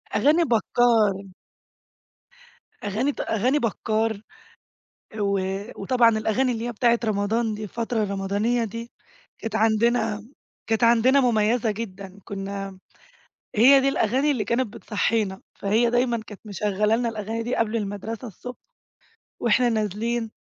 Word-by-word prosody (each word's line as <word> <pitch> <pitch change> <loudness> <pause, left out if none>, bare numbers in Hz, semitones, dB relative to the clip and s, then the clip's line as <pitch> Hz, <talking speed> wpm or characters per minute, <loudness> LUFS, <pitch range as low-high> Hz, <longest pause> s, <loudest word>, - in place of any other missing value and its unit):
أغاني 295 +11 +4
بكّار. 225 - +2 1.6
أغاني 220 +7 0
ت - - -13
أغاني 250 +7 +1
بكّار، 220 -2 -1 1.0
و 200 -1 +1 0.4
وطبعًا 240 +3 +4
الأغاني 245 +4 +1
اللي 230 +1 -4
هي 240 - -3
بتاعة 235 +1 +2
رمضان 215 +1 0
دي 215 +1 -6
الفترة 230 +1 -2
الرمضانية 205 +4 0
دي، 230 +2 -7 0.5
كانت 225 -1 -4
عندنا 225 0 +2
م 225 +6 -17 0.3
كانت 225 +1 +1
عندنا 240 +4 +5
مُميزة 225 -1 +2
جدًا 200 -3 -7
كنّا 195 0 -5
امم، 190 -1 -15 0.8
هي 265 +6 +7
دي 275 - +2
الأغاني 270 +4 +1
اللي 235 -6 -1
كانت 235 -1 -1
بتصحينا، 210 -2 -1
فهي 220 +4 +2
دايمًا 240 0 +1
كانت 210 - -11
مشغلة 210 +1 0
لنا 235 0 0
الأغاني 225 +1 -4
دي 245 - -2
قبل 230 0 0
المدرسة 215 +3 -5
الصبح 245 +4 -9 0.8
واحنا 240 +2 +3
نازلين، 225 +1 -1
225 Hz, 130 wpm, -24 LUFS, 210-240 Hz, 1.6 s, هي